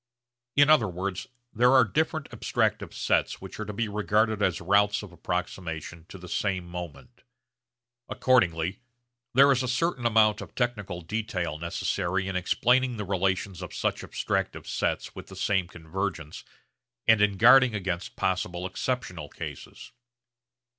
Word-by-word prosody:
In 145 0 +6
other 150 -8 +5
words 95 +1 -4 0.3
there 125 +3 +4
are 130 -1 +7
different 155 +5 -1
abstractive - - -1
sets - - 0
which - - -10
are 110 - -3
to 105 - -5
be 110 +2 -2
regarded 105 +1 +1
as 90 -4 +1
routes 100 +4 +2
of 100 - -10
approximation 85 -2 -5
to - - -9
the 90 -1 -11
same 95 -1 -1
moment. 85 -3 -9 0.9
Accordingly 90 -7 +2 0.6
there 140 +2 +7
is 130 -1 +2
a 130 - -2
certain 125 0 0
amount 110 -1 +3
of - - -10
technical 100 -8 -2
detail 90 -4 -3
necessary 85 +2 -1
in 95 - -3
explaining 125 +7 +2
the 105 - -4
relations 95 -1 -1
of 90 - -7
such - - -1
abstractive - - -2
sets - - -2
with - - -10
the - - -11
same 95 -4 0
convergence 85 -1 -5 0.6
and 110 -2 +6
in 100 -2 +3
guarding 125 +1 +7
against 90 -3 -3
possible 90 -1 -1
exceptional 95 - -3
cases. - - -9
100 Hz, 145 wpm, -27 LUFS, 90-115 Hz, 0.9 s, are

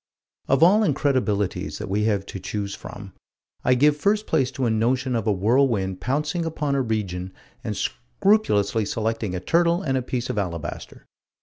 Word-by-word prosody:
Of 135 +4 +3
all 200 +6 +6
incredibilities 125 - 0
that 105 - -6
we 105 +2 0
have 100 -3 0
to 100 - -7
choose 100 +1 -4
from, 100 -2 -9 0.5
I 125 - +4
give 145 +3 +4
first 205 +8 +1
place 135 -6 +1
to 130 0 -1
a 115 - +2
notion 125 +3 +1
of 115 -2 -1
a - - +4
whirlwind 100 -2 +1
pouncing 150 +6 -1
upon 155 -3 -2
a 140 - +2
region 95 -6 -3 0.3
and 110 -4 -3
scrupulously 120 - +1
selecting 110 -2 -2
a - - -2
turtle 170 - +2
and 135 -3 0
a 130 - +1
piece 125 0 -3
of 105 - -2
alabaster. 85 -5 -5
115 Hz, 175 wpm, -24 LUFS, 100-145 Hz, 0.5 s, all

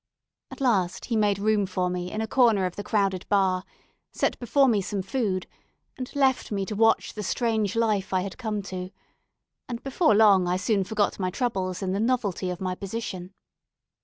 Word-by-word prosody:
At - - -10
last 195 -9 +1
he 235 - -2
made 205 -2 +2
room 205 -1 +1
for 185 -1 -1
me 180 0 -3
in 215 - -3
a 220 - -2
corner 225 -6 +3
of 180 - -3
the 205 - -5
crowded 195 -4 0
bar, 190 -2 +2 0.5
set - - -1
before 270 +3 +3
me 215 -5 +3
some 195 0 -3
food, 195 -3 -1 0.5
and 255 -1 -6
left 265 -4 +2
me 200 -2 -1
to 210 - -5
watch 225 +2 +3
the 210 - -5
strange 220 -1 0
life 215 -4 +1
I 185 -1 +2
had 195 +5 -6
come 215 -4 -3
to; 185 -1 -6 0.8
and 235 -1 -5
before 270 - +2
long 200 -4 +5
I 180 +1 +1
soon 195 +1 +1
forgot 210 0 0
my 185 -1 0
troubles 190 -4 -2
in 185 - -1
the 195 - -1
novelty 220 -6 0
of 180 0 -4
my 185 -2 -2
position. 190 -2 -6
200 Hz, 190 wpm, -26 LUFS, 185-225 Hz, 0.8 s, long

